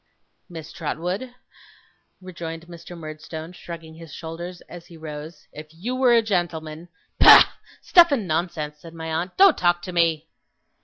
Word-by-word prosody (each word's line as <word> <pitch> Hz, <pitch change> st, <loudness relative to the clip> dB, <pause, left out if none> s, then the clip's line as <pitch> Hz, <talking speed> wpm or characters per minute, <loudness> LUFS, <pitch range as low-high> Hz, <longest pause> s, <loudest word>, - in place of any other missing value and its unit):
'Miss 160 Hz, -3 st, -9 dB
Trotwood,' 180 Hz, +10 st, -4 dB, 0.9 s
rejoined 165 Hz, -3 st, -8 dB
Mr. 170 Hz, 0 st, -11 dB
Murdstone, 155 Hz, +1 st, -8 dB
shrugging 165 Hz, -2 st, -10 dB
his 165 Hz, -1 st, -12 dB
shoulders, 170 Hz, +3 st, -8 dB
as 175 Hz, -1 st, -12 dB
he 170 Hz, -, -14 dB
rose, 155 Hz, 0 st, -9 dB
'if 150 Hz, +1 st, -9 dB
you 185 Hz, +11 st, -5 dB
were 255 Hz, -2 st, +4 dB
a 230 Hz, -, +4 dB
gentleman 170 Hz, -5 st, -3 dB
' -, -, -44 dB
'Bah! -, -, +10 dB, 0.4 s
Stuff 340 Hz, -2 st, +6 dB
and 230 Hz, -9 st, 0 dB
nonsense!' 155 Hz, -2 st, -3 dB
said 165 Hz, +2 st, -13 dB
my 160 Hz, 0 st, -6 dB
aunt. 175 Hz, +3 st, -3 dB
'Don't 385 Hz, -4 st, +6 dB
talk 175 Hz, 0 st, +2 dB
to 185 Hz, -, -6 dB
me! 165 Hz, -2 st, +1 dB
170 Hz, 155 wpm, -23 LUFS, 160-180 Hz, 0.9 s, Bah